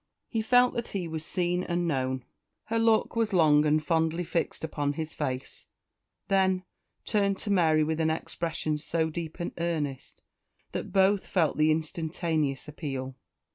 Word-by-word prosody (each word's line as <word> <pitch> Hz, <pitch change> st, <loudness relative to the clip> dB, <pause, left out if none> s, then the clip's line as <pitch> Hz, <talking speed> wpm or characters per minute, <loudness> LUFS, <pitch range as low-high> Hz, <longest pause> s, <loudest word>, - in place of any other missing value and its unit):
He 225 Hz, -, -1 dB
felt 245 Hz, +2 st, +4 dB
that 235 Hz, -, -3 dB
he 185 Hz, -4 st, -3 dB
was 160 Hz, -1 st, -4 dB
seen 180 Hz, +1 st, 0 dB
and 175 Hz, -1 st, -1 dB
known. 130 Hz, -4 st, -1 dB, 0.4 s
Her 230 Hz, +1 st, -1 dB
look 225 Hz, 0 st, +3 dB
was 225 Hz, -2 st, +1 dB
long 155 Hz, -4 st, +5 dB
and 155 Hz, +1 st, +2 dB
fondly 165 Hz, +1 st, +1 dB
fixed 170 Hz, -1 st, -2 dB
upon 145 Hz, -2 st, -1 dB
his 160 Hz, +1 st, -5 dB
face; 130 Hz, -3 st, -4 dB, 0.6 s
then 190 Hz, -1 st, +2 dB, 0.4 s
turned 200 Hz, -2 st, +1 dB
to 205 Hz, -, -3 dB
Mary 160 Hz, -5 st, +4 dB
with 160 Hz, +1 st, -1 dB
an 160 Hz, -, +2 dB
expression 160 Hz, -1 st, -2 dB
so 160 Hz, +1 st, -1 dB
deep 165 Hz, +1 st, -6 dB
and 175 Hz, -, -3 dB
earnest 155 Hz, -6 st, -3 dB, 0.5 s
that -, -, -4 dB
both 195 Hz, +1 st, +3 dB
felt 165 Hz, -6 st, +1 dB
the 155 Hz, 0 st, +4 dB
instantaneous 160 Hz, -2 st, -1 dB
appeal. 135 Hz, -4 st, -5 dB
160 Hz, 155 wpm, -28 LUFS, 155-185 Hz, 0.6 s, long